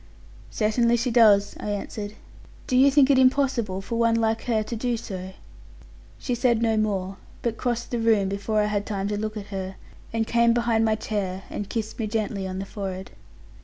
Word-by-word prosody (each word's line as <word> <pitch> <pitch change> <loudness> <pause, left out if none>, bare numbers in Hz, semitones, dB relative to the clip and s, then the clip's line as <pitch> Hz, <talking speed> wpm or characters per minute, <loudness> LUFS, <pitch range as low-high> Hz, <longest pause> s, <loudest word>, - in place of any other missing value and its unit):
'Certainly, 235 +2 +2
she 235 +1 -1
does,' 210 -4 +5
I - - -4
answered. 205 +1 -4 0.5
'Do 255 - -1
you 265 +2 +7
think 280 0 +5
it 265 - +5
impossible 255 -7 +2
for 230 +4 -3
one 230 0 +3
like 225 0 0
her 225 -3 +1
to 230 - -5
do 240 +1 -1
so?' 190 -3 -7 0.8
She 250 - -3
said 240 -1 +2
no 225 -1 +2
more; 195 -3 -1 0.3
but 235 -2 -1
crossed 240 -1 -2
the 240 - -1
room 220 -4 +3
before 200 +2 0
I - - +2
had 205 -1 -1
time 200 -2 -2
to 210 - -1
look 215 +1 -3
at 205 - -6
her, 190 0 -4 0.4
and 225 0 0
came 235 0 +3
behind 235 -1 +2
my 220 -1 +2
chair, 195 -3 -3
and 205 - -5
kissed 220 0 -4
me 220 - -1
gently 210 -3 -2
on 185 0 -5
the 195 - -4
forehead. 190 -2 -6
220 Hz, 200 wpm, -25 LUFS, 200-235 Hz, 0.8 s, you